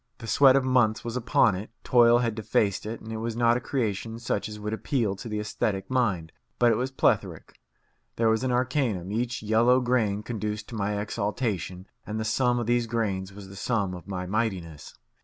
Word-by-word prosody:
The - - -9
sweat 130 +5 +6
of 135 - +3
months 125 -4 +2
was 115 0 -4
upon 125 -2 +3
it, 95 +4 -5
toil 120 -1 +5
had 120 -2 0
defaced 105 -2 0
it, 115 +1 -5
and 110 0 -7
it - - -3
was 115 0 -3
not 120 0 +3
a - - 0
creation 115 -4 -2
such 115 -3 -2
as 105 0 -8
would 105 +1 -4
appeal 110 -3 -1
to 115 +4 -8
the 105 -1 -2
aesthetic 100 -1 -2
mind; 100 -11 0 0.3
but 120 -1 +4
it - - +3
was 125 +4 -1
plethoric. 135 - -1 0.6
There 115 - +2
was 110 0 +2
the 130 - -1
arcanum; 125 - 0
each 120 +1 -2
yellow 115 +4 +4
grain 115 -5 0
conduced 105 -2 -4
to 115 - -7
my 105 -1 -1
exaltation, 100 -3 -3 0.2
and 110 +1 -4
the 110 - -2
sum 125 +2 +2
of 120 - -1
these 120 0 +1
grains 100 -5 -2
was 100 0 -11
the 95 - -11
sum 100 -2 -1
of 90 +1 -9
my 90 -2 -4
mightiness. 90 -7 -3
110 Hz, 205 wpm, -27 LUFS, 100-120 Hz, 0.6 s, sweat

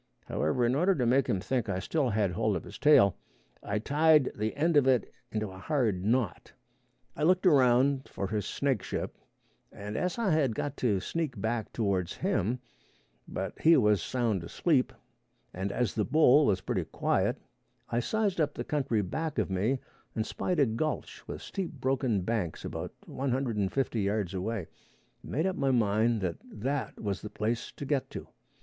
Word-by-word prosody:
However, 100 +11 0
in 120 - +2
order 180 +7 +3
to 125 - 0
make 130 +3 +3
him 95 - +1
think 120 +2 -1
I 95 - 0
still 135 +7 0
had 105 -3 +1
hold 110 +2 0
of 85 - -3
his - - -10
tail, 100 -11 +6 0.4
I 100 - -2
tied 150 +4 +4
the 110 +1 -2
end 160 +3 +1
of 140 -3 +5
it 130 -3 +2 0.2
into 110 -2 -2
a 95 - -10
hard 110 - 0
knot. 115 -1 0 0.6
I - - -7
looked 185 +4 +3
around 135 -3 +4
for 100 - -4
his 105 -1 -2
snakeship, 135 -8 -2 0.6
as 105 - -3
I 225 -5 +1
had 140 -8 +2
got 145 +4 -3
to 105 -6 +1
sneak 155 - -3
back 110 0 -2
towards 95 -5 -1
him, 120 - 0 0.7
but - - -5
he 165 +1 +7
was 105 -6 +3
sound 115 -7 -1
asleep, 135 - +1 0.6
and 95 +2 -3
as 120 -1 0
the 110 - 0
bull 150 +2 +5
was 95 -3 +2
pretty - - -2
quiet, - - 0 0.5
I 120 - +1
sized 205 - 0
up 150 -1 0
the - - -3
country 135 -8 0
back 155 - -3
of 105 -3 0
me 105 +9 +1 0.4
and 110 - 0
spied 180 +6 -2
a 140 - +6
gulch 125 +7 -3
with - - -6
steep 190 -4 -4
broken 130 -6 0
banks 95 -5 -2
about - - -5
one 135 +1 -3
hundred 125 -2 0
and 100 -2 0
fifty 130 -5 0
yards 100 -2 -1
away, 95 0 -2 0.6
and - - -10
made 155 +6 0
up 190 -1 0
my 140 -1 +1
mind 110 -1 +2
that 90 -3 -2
that 130 +4 -4
was 100 -3 -3
the 105 - -6
place 115 +3 -2
to 145 - -7
get 140 -1 0
to. - - -7
120 Hz, 180 wpm, -30 LUFS, 105-145 Hz, 0.7 s, he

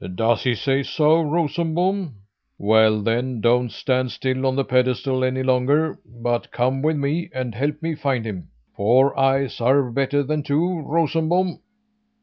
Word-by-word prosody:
"Does 115 +3 +1
he 125 -2 +2
say 135 +6 0
so, 155 +3 +2
Rosenbom? 170 - -1 0.4
Well 110 0 +3
then, 120 +2 -1
don't 120 +1 +2
stand 130 -1 -1
still 130 0 -2
on 130 - 0
the 135 0 0
pedestal 130 +1 0
any 130 0 0
longer 130 +5 +1
but 120 +1 -3
come 130 +2 -1
with 155 +1 +1
me 150 +5 -2
and 130 -3 -3
help 145 +6 -3
me 165 0 -1
find 140 -6 -2
him. 95 -7 -6 0.3
Four 125 +7 +3
eyes 135 -1 +1
are 130 +1 +2
better 140 +3 0
than 150 +2 -2
two, 165 +5 0
Rosenbom." 165 +3 0
135 Hz, 150 wpm, -22 LUFS, 125-155 Hz, 0.4 s, Well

